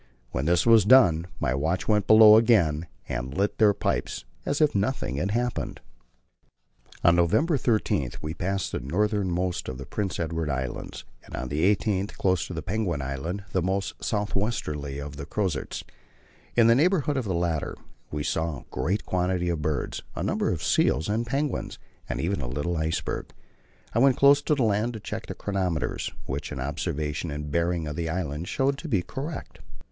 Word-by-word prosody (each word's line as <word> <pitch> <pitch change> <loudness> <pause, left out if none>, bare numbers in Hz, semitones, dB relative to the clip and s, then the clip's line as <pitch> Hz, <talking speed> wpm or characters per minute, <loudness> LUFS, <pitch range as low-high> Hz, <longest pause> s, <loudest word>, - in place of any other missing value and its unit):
When 65 +3 -2
this 85 +1 +3
was 115 -3 +7
done, 90 -8 +6
my - - +1
watch 80 +7 -1
went 105 -2 +2
below 110 -1 +9
again 85 -9 +3 0.2
and 65 +2 -4
lit 100 +1 0
their 105 -2 +6
pipes - - -2 0.2
as 140 - 0
if 150 -2 +4
nothing 100 - -1
had 90 +7 0
happened. 120 +2 -2 1.2
On 85 - +6
November 115 - +3
13 110 - +1
we 75 +1 -4
passed 95 +2 -2
the - - -2
northernmost 90 - -1
of 65 - -5
the 70 - -7
Prince 100 +2 -3
Edward 80 -1 -2
Islands, 65 -2 -4 0.2
and - - -9
on 65 - -4
the 75 +2 -1
18th 100 0 -2
close 95 -4 +1
to 80 -3 -4
Penguin 95 -7 -1
Island, 70 +9 -4
the 95 - +1
most 95 +3 -2
south 105 -1 -1
westerly 75 -10 -2
of 70 0 -7
the 70 - -7
Crozets. 95 -10 -2 0.7
In 120 - +6
the 115 - +7
neighbourhood 150 +1 +2
of 130 -3 -1
the 95 -4 -1
latter 85 -3 -1 0.3
we 75 0 -3
saw 80 -1 -1
a - - -20
great 85 +11 -1
quantity 90 -1 0
of 85 -3 -1
birds, 75 -2 -2
a - - -3
number - - 0
of - - -3
seals 80 - +2
and 115 +3 0
penguins, 140 +4 -2 0.3
and - - -2
even 90 0 -1
a 65 - -3
little 75 +7 -2
iceberg. 80 0 -2 0.7
I 115 - +2
went 135 0 +5
close 140 +1 +6
to 150 - +1
the 135 - +1
land 110 +2 +1
to 110 - -6
check - - -6
the - - -5
chronometers, 95 -6 -2
which 70 +3 -4
an - - -5
observation 75 +3 -2
and 75 0 -5
bearings 85 0 0
of 75 - -4
the 80 0 -2
islands 80 -1 -3
showed 135 +1 0
to 170 - -6
be 100 - +1
correct. 145 - -6
90 Hz, 185 wpm, -26 LUFS, 75-110 Hz, 1.2 s, below